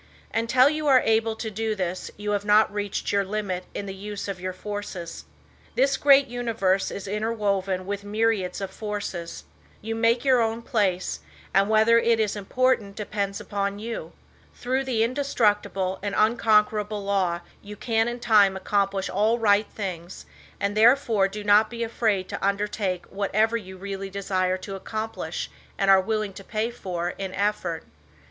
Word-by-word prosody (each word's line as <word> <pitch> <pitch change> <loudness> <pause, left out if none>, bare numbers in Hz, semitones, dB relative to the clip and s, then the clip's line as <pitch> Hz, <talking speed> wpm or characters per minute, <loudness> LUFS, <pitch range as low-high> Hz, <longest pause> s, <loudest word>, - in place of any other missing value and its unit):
Until 250 +3 +4
you 305 0 -1
are 260 -3 +6
able 225 0 +2
to 220 0 -5
do 220 +1 -2
this 185 -2 -3
you 210 0 -3
have 205 -1 0
not 210 +1 +4
reached 205 -1 -2
your 200 0 +2
limit 195 -2 -3
in 200 - -3
the 195 - -5
use 205 +1 -6
of 195 -3 -5
your 185 0 -2
forces. 185 -3 -6 0.5
This 270 +1 +3
great 280 0 +6
universe 230 -6 0
is 200 0 -6
interwoven 200 -3 -1
with 200 +1 -4
myriads 205 -3 0
of 195 -1 -4
forces. 200 -5 -5 0.4
You 225 +1 -4
make 230 +3 +2
your 255 -3 +5
own 225 +1 -1
place, 190 -6 0 0.3
and 195 +2 +3
whether 220 +2 +5
it 230 -1 +2
is 215 -1 0
important 210 0 0
depends 200 -1 -3
upon 200 0 -2
you. 225 +2 -6 0.4
Through 260 +2 -1
the 235 -4 +1
Indestructible 210 -7 0
and 200 0 -3
Unconquerable 215 -2 +2
Law 185 -4 0 0.2
you 210 0 -9
can 225 +1 0
in 240 +1 -3
time 205 -5 +4
accomplish 195 0 0
all 215 +4 +2
right 210 -2 +3
things 180 -4 -6 0.3
and 200 +1 -1
therefore 225 -3 +4
do 205 +2 -7
not 210 +1 +5
be 235 -1 -4
afraid 220 -4 0
to - - -5
undertake 200 -2 -1
whatever 210 +3 +1
you 190 -4 -6
really 195 0 -5
desire 185 -1 -1
to 195 +2 -8
accomplish 215 -3 -5 0.3
and 195 0 +4
are 190 0 +7
willing 215 0 -2
to 195 - -10
pay 220 +3 -2
for 180 -6 -3
in 190 -1 -4
effort. 200 -5 -1
205 Hz, 165 wpm, -25 LUFS, 195-225 Hz, 0.5 s, are